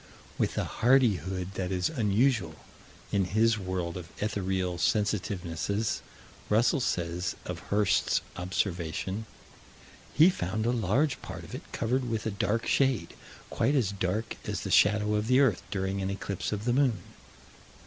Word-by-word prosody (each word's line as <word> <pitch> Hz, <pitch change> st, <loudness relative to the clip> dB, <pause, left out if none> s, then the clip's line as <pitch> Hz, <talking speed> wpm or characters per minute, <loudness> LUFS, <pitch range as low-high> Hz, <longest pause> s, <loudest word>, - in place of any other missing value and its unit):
With -, -, 0 dB
a -, -, +1 dB
hardihood 95 Hz, -, +2 dB
that 95 Hz, -1 st, -3 dB
is 90 Hz, -1 st, +1 dB
unusual 110 Hz, -, +1 dB, 0.6 s
in 100 Hz, -2 st, +2 dB
his 110 Hz, +3 st, +2 dB
world 90 Hz, -2 st, -3 dB
of 85 Hz, -2 st, -8 dB
ethereal 95 Hz, -4 st, -1 dB
sensitivenesses, 100 Hz, 0 st, 0 dB, 0.5 s
Russell 115 Hz, +6 st, +3 dB
says, 90 Hz, -6 st, -1 dB
of -, -, -5 dB
Hirst's 105 Hz, -1 st, +2 dB
observation: 90 Hz, +3 st, -2 dB, 0.9 s
"He 165 Hz, +5 st, +7 dB
found 110 Hz, -, -2 dB
a 120 Hz, -, +2 dB
large 125 Hz, -, +1 dB
part -, -, -7 dB
of -, -, -11 dB
it -, -, -8 dB
covered 125 Hz, +2 st, -1 dB
with 110 Hz, -2 st, -2 dB
a 110 Hz, -, 0 dB
dark 105 Hz, +3 st, 0 dB
shade, 130 Hz, -11 st, +1 dB, 0.4 s
quite 145 Hz, -, +1 dB
as 115 Hz, -8 st, +2 dB
dark 100 Hz, +3 st, -2 dB
as -, -, -3 dB
the -, -, -4 dB
shadow 105 Hz, 0 st, +4 dB
of 105 Hz, +1 st, 0 dB
the 130 Hz, +2 st, +5 dB
earth 130 Hz, -10 st, +3 dB
during 95 Hz, -1 st, -2 dB
an 95 Hz, -, -1 dB
eclipse 100 Hz, -1 st, -3 dB
of 105 Hz, 0 st, -3 dB
the 120 Hz, -, +2 dB
moon." 130 Hz, -4 st, +3 dB
105 Hz, 150 wpm, -29 LUFS, 95-115 Hz, 0.9 s, He